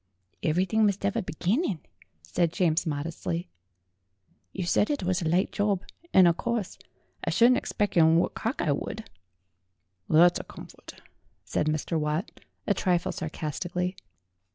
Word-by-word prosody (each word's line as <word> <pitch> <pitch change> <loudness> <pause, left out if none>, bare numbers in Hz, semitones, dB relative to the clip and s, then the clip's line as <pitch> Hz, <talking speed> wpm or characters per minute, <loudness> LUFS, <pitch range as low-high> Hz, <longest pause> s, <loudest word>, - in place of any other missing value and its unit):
"Ev'rythink 185 +7 +2
must 200 -1 +1
'ave 200 - +1
a - - -1
beginnin'," 185 - -1 0.4
said 165 - 0
James 170 -1 +1
modestly. 145 - -3 1.0
"You 185 - -4
said 205 - +2
it 290 -8 -1
was 185 +1 0
a 165 - -1
light 180 +3 +2
job. 205 -2 0 0.3
And 185 -2 +7
o' 170 - +5
course 230 +1 -3 0.4
I - - -1
shouldn't 245 +2 +5
egspec' 210 -2 -1
whort 165 +2 +4
Cockeye 225 - -1
would." 215 +9 -4 1.0
"That's 175 +3 +5
a - - -6
comfort," - - -12 0.5
said 150 - -1
Mr. 155 +2 -1
Watt, 150 +4 -2 0.3
a - - +2
trifle 180 -2 0
sarcasti 155 +2 -4
cally. 180 +1 -1
175 Hz, 140 wpm, -27 LUFS, 160-200 Hz, 1.0 s, And